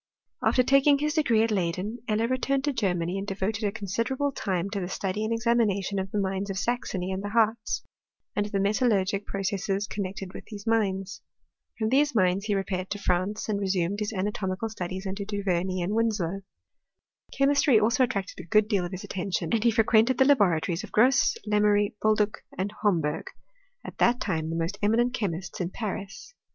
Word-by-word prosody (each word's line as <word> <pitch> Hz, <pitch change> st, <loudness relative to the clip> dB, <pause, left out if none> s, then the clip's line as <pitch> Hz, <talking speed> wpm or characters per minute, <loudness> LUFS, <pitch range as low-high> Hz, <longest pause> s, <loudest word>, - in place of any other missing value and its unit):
After 255 Hz, -, +4 dB
taking 275 Hz, +2 st, +5 dB
his 300 Hz, +1 st, -1 dB
degree 240 Hz, -9 st, +3 dB
at 225 Hz, -, 0 dB
Leyd^n, 190 Hz, +3 st, -1 dB
Eller 220 Hz, +1 st, +1 dB
returned 265 Hz, +2 st, 0 dB
to 290 Hz, -1 st, 0 dB
Germany, 180 Hz, -5 st, -1 dB
and 195 Hz, -, -5 dB
devoted 205 Hz, +3 st, -2 dB
a 205 Hz, -, +1 dB
considerably 230 Hz, +7 st, -1 dB
timQ 195 Hz, -5 st, -2 dB
to 205 Hz, -, -2 dB
the 180 Hz, -, -3 dB
study 195 Hz, +2 st, -2 dB
and 220 Hz, -, -2 dB
examination 225 Hz, -4 st, +1 dB
of 190 Hz, 0 st, -3 dB
the 210 Hz, -, -3 dB
mines 195 Hz, +1 st, -2 dB
of 195 Hz, -, -3 dB
8axony 195 Hz, -5 st, -2 dB
and 190 Hz, -, -3 dB
the 205 Hz, -, -3 dB
Hartz, 220 Hz, 0 st, +1 dB, 0.5 s
and 205 Hz, 0 st, 0 dB
of -, -, -12 dB
the 200 Hz, -, 0 dB
metalluigic 200 Hz, -1 st, +1 dB
pro 195 Hz, -, -3 dB
r -, -, -4 dB
cesses 195 Hz, +1 st, -1 dB
connected 195 Hz, -1 st, -5 dB
with -, -, -8 dB
these 205 Hz, -2 st, -9 dB
mines. 205 Hz, -3 st, 0 dB, 0.6 s
From 220 Hz, -1 st, 0 dB
these 285 Hz, +4 st, +3 dB
inin^ 185 Hz, -3 st, +2 dB
he 210 Hz, -1 st, 0 dB
repaired 190 Hz, -1 st, -2 dB
to 205 Hz, -, -3 dB
France, 190 Hz, +2 st, -1 dB
and 210 Hz, -2 st, -1 dB
resumed 190 Hz, 0 st, 0 dB
his 210 Hz, 0 st, -2 dB
anatomical 195 Hz, +1 st, -2 dB
studies 190 Hz, -2 st, -5 dB
under 195 Hz, +1 st, -3 dB
Du 200 Hz, 0 st, -4 dB
Vemey 185 Hz, -1 st, 0 dB
and 190 Hz, +4 st, -2 dB
Winslow. 205 Hz, -5 st, 0 dB, 1.0 s
Chemistry 275 Hz, -3 st, +4 dB
also 230 Hz, +4 st, +3 dB
attracted 200 Hz, -6 st, -2 dB
a -, -, -6 dB
good 210 Hz, +4 st, +4 dB
deal 200 Hz, -4 st, +1 dB
of 175 Hz, -, -5 dB
his 185 Hz, -1 st, -6 dB
attention, 180 Hz, -3 st, -3 dB
s^nd 225 Hz, -, +2 dB
he 240 Hz, -, +5 dB
fre 225 Hz, 0 st, +3 dB
quented 225 Hz, +3 st, +4 dB
the 265 Hz, -, +5 dB
laboratories 180 Hz, -, +2 dB
of -, -, -9 dB
Grosse, 250 Hz, +4 st, +4 dB
Lemery, 210 Hz, -1 st, +3 dB
Boldue, 215 Hz, -1 st, +3 dB, 0.3 s
and 195 Hz, +2 st, -2 dB
Homberg, 165 Hz, -7 st, 0 dB, 0.6 s
at -, -, -9 dB
that 240 Hz, +1 st, +4 dB
time 160 Hz, -5 st, -2 dB
the 165 Hz, -, -3 dB
most 170 Hz, +5 st, -2 dB
eminent 235 Hz, +4 st, +2 dB
chexQists 190 Hz, -5 st, -3 dB
in 175 Hz, -, -1 dB
Paris. 200 Hz, -, -6 dB
205 Hz, 195 wpm, -27 LUFS, 190-225 Hz, 1.0 s, taking